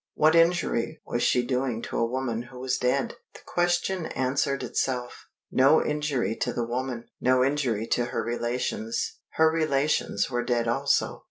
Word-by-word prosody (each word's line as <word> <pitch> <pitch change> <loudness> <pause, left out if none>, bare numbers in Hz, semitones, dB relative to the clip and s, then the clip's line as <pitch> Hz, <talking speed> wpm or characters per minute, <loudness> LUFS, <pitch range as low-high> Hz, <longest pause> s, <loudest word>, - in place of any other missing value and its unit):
What 155 +1 +4
injury 165 -5 +2
was 120 - -2
she 125 0 +2
doing 125 -2 -1
to - - -4
a 115 - +3
woman 120 -1 -3
who 125 - -12
was 130 0 -1
dead? 125 0 0 0.2
The - - -12
question 175 0 0
answered 135 +1 -1
itself. 125 -2 -3 0.2
No 135 +4 +5
injury 145 -8 -1
to - - -1
the 120 - -2
woman. 120 0 -3 0.2
No 130 0 +4
injury 130 -6 0
to 120 - +1
her 120 - -2
relations. 120 -1 -2
Her 160 0 +4
relations 150 -9 +1
were 120 -1 -1
dead 120 -1 0
also. 135 +4 +1
130 Hz, 160 wpm, -26 LUFS, 120-150 Hz, 0.2 s, No